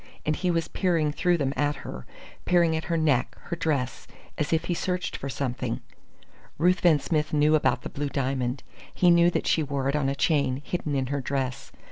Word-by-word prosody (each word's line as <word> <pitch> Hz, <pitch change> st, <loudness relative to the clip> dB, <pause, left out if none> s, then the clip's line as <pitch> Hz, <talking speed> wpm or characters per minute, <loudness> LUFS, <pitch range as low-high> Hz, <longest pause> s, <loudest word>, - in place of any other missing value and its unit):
And 155 Hz, -, +1 dB
he 180 Hz, -, -1 dB
was 165 Hz, -2 st, 0 dB
peering 165 Hz, -5 st, +1 dB
through 175 Hz, +3 st, +1 dB
them 140 Hz, -3 st, -1 dB
at 145 Hz, 0 st, +1 dB
her 65 Hz, -, -7 dB, 0.4 s
peering 170 Hz, -2 st, +3 dB
at 160 Hz, -, -3 dB
her 170 Hz, 0 st, 0 dB
neck, 145 Hz, -6 st, +1 dB
her 170 Hz, -, -5 dB
dress, 145 Hz, -7 st, -2 dB, 0.3 s
as 150 Hz, -, -2 dB
if 160 Hz, -1 st, +1 dB
he 175 Hz, -, 0 dB
searched 180 Hz, +1 st, -2 dB
for 140 Hz, -, -5 dB
something. 130 Hz, -2 st, -3 dB, 0.8 s
Ruthven 175 Hz, -1 st, +4 dB
Smith 155 Hz, 0 st, -1 dB
knew 150 Hz, +1 st, +4 dB
about 155 Hz, -, +2 dB
the -, -, -5 dB
blue 145 Hz, 0 st, -3 dB
diamond. 130 Hz, -2 st, -2 dB, 0.3 s
He 180 Hz, -1 st, +4 dB
knew 170 Hz, 0 st, +6 dB
that -, -, -2 dB
she 160 Hz, -, +2 dB
wore 140 Hz, -2 st, -1 dB
it 140 Hz, -, 0 dB
on 140 Hz, -2 st, +1 dB
a 140 Hz, -, -1 dB
chain, 140 Hz, -3 st, +1 dB
hidden 155 Hz, -5 st, -2 dB
in 135 Hz, -1 st, 0 dB
her 140 Hz, -, -1 dB
dress. 130 Hz, -1 st, -3 dB
150 Hz, 200 wpm, -26 LUFS, 140-170 Hz, 0.8 s, knew